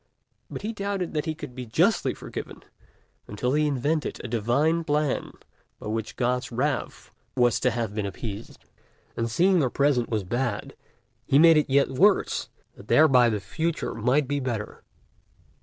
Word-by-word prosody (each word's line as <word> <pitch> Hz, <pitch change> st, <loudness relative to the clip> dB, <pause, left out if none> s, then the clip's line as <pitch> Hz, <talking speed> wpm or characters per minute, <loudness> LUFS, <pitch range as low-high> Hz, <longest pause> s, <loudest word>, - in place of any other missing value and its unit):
But -, -, -7 dB
he 220 Hz, +2 st, -3 dB
doubted 200 Hz, -3 st, -3 dB
whether 150 Hz, 0 st, -1 dB
he 160 Hz, -1 st, -2 dB
could 150 Hz, -5 st, -9 dB
be 125 Hz, -1 st, -7 dB
justly 110 Hz, -, +2 dB
forgiven, -, -, -8 dB, 0.6 s
until 125 Hz, +5 st, -2 dB
he 150 Hz, +1 st, +2 dB
invented 145 Hz, +3 st, -1 dB
a -, -, -4 dB
divine 125 Hz, +9 st, +1 dB
Plan 150 Hz, -2 st, -1 dB, 0.5 s
by -, -, -6 dB
which 110 Hz, 0 st, -4 dB
God's 125 Hz, 0 st, -1 dB
wrath 130 Hz, +4 st, -3 dB, 0.2 s
was 120 Hz, -2 st, +3 dB
to 130 Hz, -, +2 dB
have 115 Hz, -3 st, -3 dB
been 105 Hz, -2 st, -2 dB
appeased. 100 Hz, +2 st, -8 dB, 0.5 s
And 115 Hz, 0 st, -2 dB
seeing 180 Hz, -, +3 dB
the 135 Hz, -5 st, +2 dB
present 140 Hz, -3 st, +1 dB
was 110 Hz, -3 st, -1 dB
bad, 120 Hz, +2 st, -3 dB, 0.5 s
he 135 Hz, -, +4 dB
made 165 Hz, +1 st, +7 dB
it 150 Hz, -, +1 dB
yet 140 Hz, +1 st, +3 dB
worse, 190 Hz, +10 st, +2 dB, 0.3 s
that 100 Hz, -, -14 dB
thereby 130 Hz, -6 st, +5 dB
the 105 Hz, -2 st, -1 dB
future 160 Hz, -, -3 dB
might 125 Hz, +5 st, +1 dB
be 145 Hz, +1 st, -1 dB
better. 120 Hz, -6 st, -4 dB
130 Hz, 160 wpm, -25 LUFS, 115-155 Hz, 0.6 s, made